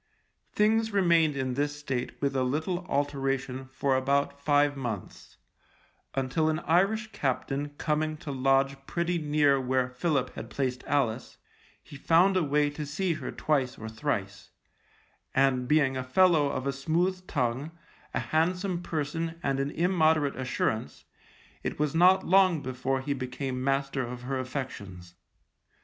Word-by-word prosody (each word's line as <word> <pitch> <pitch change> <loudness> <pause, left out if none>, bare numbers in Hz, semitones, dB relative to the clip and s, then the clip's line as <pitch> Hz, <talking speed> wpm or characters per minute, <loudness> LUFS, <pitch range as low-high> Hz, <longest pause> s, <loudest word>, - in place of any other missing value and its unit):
Things 220 +1 +2
remained 170 -6 +3
in 130 -2 -1
this 145 +2 -1
state 135 -4 -4
with 140 -1 0
a 130 - +2
little 160 +7 -2
alteration 135 -2 -1
for 135 0 +1
about 140 +2 0
five 145 0 +3
months, 120 -8 -6 0.8
until 135 +4 +1
an 155 - 0
Irish 205 +7 +1
captain 140 - -2
coming 155 0 -1
to 150 - -7
lodge 135 +1 +1
pretty 170 0 -1
near 145 -3 +3
where 130 0 0
Philip 135 -1 -1
had 115 - -7
placed 130 -2 -2
Alice, 125 -4 -1 0.5
he - - -12
found 175 +6 +4
a 185 - +3
way 145 -1 +1
to 150 +1 -5
see 165 +5 -1
her 155 - -5
twice 135 -5 0
or 110 - -7
thrice, 105 -5 -3 0.9
and 130 -2 +2
being 140 -2 +3
a 130 - -2
fellow 160 +2 +4
of 130 -1 -3
a 140 - 0
smooth 175 +7 -1
tongue, 130 +1 -1 0.4
a - - -1
handsome 180 +3 0
person 165 +1 -3
and 135 -1 0
an 140 +1 0
immoderate 160 -4 +2
assurance, 120 - -2 0.6
it - - -4
was 150 -1 0
not 180 +3 +5
long 185 -4 +4
before 130 +1 -2
he 140 +1 -1
became 130 0 -4
master 135 0 0
of 125 0 -6
her 130 +1 -2
affections. 100 -10 -6
140 Hz, 145 wpm, -28 LUFS, 130-160 Hz, 0.9 s, not